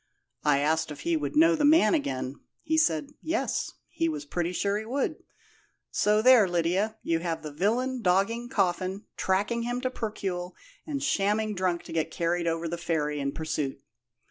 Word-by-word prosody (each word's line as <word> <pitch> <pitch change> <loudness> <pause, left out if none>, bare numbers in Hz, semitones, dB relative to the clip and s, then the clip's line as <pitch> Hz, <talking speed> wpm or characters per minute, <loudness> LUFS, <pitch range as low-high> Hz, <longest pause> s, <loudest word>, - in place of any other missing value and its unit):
I 145 -2 +4
asked 160 +2 +1
if 145 -1 -8
he 170 +2 +1
would 145 -3 -2
know 165 +2 +6
the - - -1
man 290 -7 +6
again. 135 - -2 0.3
He 315 - 0
said, 160 - +2
'Yes,' 330 +1 -1
he 330 0 -1
was 305 -1 -4
pretty 175 -10 -2
sure 200 +2 0
he - - -6
would. 265 +5 -1 0.7
So 210 +1 +2
there, 250 -5 +7
Lydia, 180 +6 0
you 165 -1 +1
have 165 -2 -3
the 150 - -6
villain 235 - 0
dogging 210 +5 +1
Coffin, 190 -3 0
tracking 205 +5 0
him 245 +1 -2
to 255 0 -1
Percuil, 190 -6 -4 0.3
and 285 -2 -3
shamming 215 -5 +1
drunk 180 -3 -1
to - - -9
get 165 -1 0
carried 170 +1 -1
over 165 0 -1
the 170 +1 -4
ferry 150 -4 -1
in 140 0 -1
pursuit. 150 -3 -3
185 Hz, 175 wpm, -28 LUFS, 165-230 Hz, 0.7 s, there